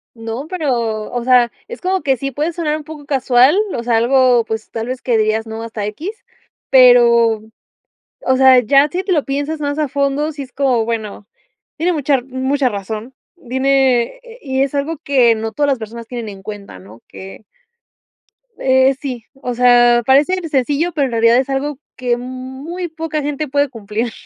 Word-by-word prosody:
No, 225 Hz, +5 st, -6 dB
pero, 235 Hz, -, -2 dB
o 245 Hz, -1 st, -2 dB
sea, 245 Hz, -1 st, +4 dB, 0.2 s
es 475 Hz, -, -7 dB
como 375 Hz, +1 st, -1 dB
que 270 Hz, -3 st, +1 dB
sí 275 Hz, +3 st, -4 dB
puede 300 Hz, +6 st, -2 dB
sonar 315 Hz, -3 st, -2 dB
un 310 Hz, -, -6 dB
poco 300 Hz, -1 st, -10 dB
casual, 265 Hz, 0 st, +3 dB, 0.2 s
o -, -, -3 dB
sea, 235 Hz, -1 st, 0 dB
algo, 245 Hz, +1 st, +3 dB
pues, 220 Hz, -1 st, -5 dB
tal 225 Hz, 0 st, -5 dB
vez 255 Hz, 0 st, -5 dB
que 240 Hz, -3 st, +1 dB
dirías 220 Hz, +1 st, 0 dB
no 220 Hz, +1 st, -6 dB
hasta 220 Hz, -2 st, -5 dB
equis, 295 Hz, -, -5 dB, 0.6 s
pero, 235 Hz, -3 st, +5 dB, 0.8 s
o 260 Hz, -, +1 dB
sea, 260 Hz, -1 st, +6 dB
ya 275 Hz, +5 st, +4 dB
si 360 Hz, +5 st, -3 dB
te 390 Hz, -, -5 dB
lo 310 Hz, -6 st, +2 dB
piensas 285 Hz, +3 st, -3 dB
más 285 Hz, -1 st, -2 dB
a 300 Hz, -, 0 dB
fondo 280 Hz, +2 st, -1 dB
si 295 Hz, -2 st, -7 dB
es 260 Hz, -1 st, -12 dB
como, 260 Hz, -5 st, +1 dB
bueno, 220 Hz, -3 st, -5 dB, 0.5 s
tiene 350 Hz, +3 st, 0 dB
mucha 290 Hz, -3 st, 0 dB
r 250 Hz, -, -5 dB
mucha 265 Hz, +1 st, -1 dB
razón. 215 Hz, +3 st, -6 dB, 0.2 s
Dime 260 Hz, -3 st, +2 dB
e -, -, -9 dB
e 475 Hz, -1 st, -14 dB
y 265 Hz, -1 st, -1 dB
es 275 Hz, +1 st, -2 dB
algo 295 Hz, +3 st, -2 dB
que 260 Hz, -6 st, +3 dB
no 225 Hz, 0 st, -4 dB
todas 290 Hz, +6 st, 0 dB
las 270 Hz, -2 st, +1 dB
personas 230 Hz, +1 st, -8 dB
tienen 235 Hz, -2 st, -6 dB
en 195 Hz, -2 st, -10 dB
cuenta, 200 Hz, -, -9 dB
¿no? 105 Hz, +5 st, -15 dB
Que. 195 Hz, +3 st, -11 dB, 1.1 s
Eh, 260 Hz, 0 st, +3 dB
sí, 250 Hz, -5 st, -5 dB
o 260 Hz, -2 st, -5 dB
sea, 240 Hz, -1 st, +4 dB
parece 280 Hz, +7 st, +4 dB, 0.2 s
sencillo, 290 Hz, +4 st, 0 dB
pero, 290 Hz, -3 st, +1 dB
en 260 Hz, -, -4 dB
realidad 230 Hz, +1 st, +4 dB
es 260 Hz, +1 st, 0 dB
algo 275 Hz, +1 st, -2 dB, 0.2 s
que 245 Hz, -1 st, -1 dB
muy 260 Hz, +8 st, -6 dB
poca 315 Hz, -1 st, -4 dB
gente 295 Hz, +1 st, -3 dB
puede 285 Hz, +1 st, +1 dB
cumplir. 225 Hz, 0 st, -4 dB
260 Hz, 190 wpm, -17 LUFS, 235-285 Hz, 1.1 s, sea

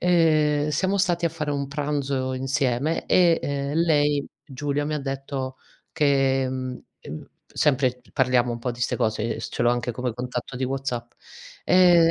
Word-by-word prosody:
uhm, 155 Hz, -4 st, +3 dB
siamo 190 Hz, +7 st, +1 dB
stati 175 Hz, -3 st, +1 dB
a -, -, +4 dB
fare 155 Hz, -2 st, -4 dB
un 140 Hz, -1 st, -1 dB
pranzo 140 Hz, -2 st, -2 dB
insieme 135 Hz, +3 st, 0 dB
e, 170 Hz, -2 st, +4 dB
uhm, 140 Hz, 0 st, -2 dB
lei, 145 Hz, -3 st, +2 dB, 0.2 s
Giulia, 145 Hz, +2 st, -2 dB
mi 150 Hz, +1 st, -2 dB
ha -, -, -1 dB
detto 135 Hz, -1 st, -4 dB, 0.4 s
che 135 Hz, -2 st, +2 dB
mhmm, 130 Hz, -1 st, -4 dB, 0.7 s
sempre 130 Hz, -4 st, +1 dB
parliamo 125 Hz, -2 st, +2 dB
un 120 Hz, -, -4 dB
po' 125 Hz, +1 st, -2 dB
di 120 Hz, 0 st, -8 dB
ste -, -, 0 dB
cose, 110 Hz, -3 st, 0 dB
ehm, -, -, -7 dB
ce -, -, -3 dB
l'ho 120 Hz, -, +4 dB
anche 120 Hz, 0 st, -1 dB
come 125 Hz, +1 st, -3 dB
contatto 125 Hz, +1 st, -5 dB
di 130 Hz, -, -1 dB
WhatsApp. 125 Hz, -3 st, -3 dB, 0.5 s
"Ehm, 175 Hz, -2 st, +6 dB
140 Hz, 165 wpm, -24 LUFS, 130-150 Hz, 0.7 s, Ehm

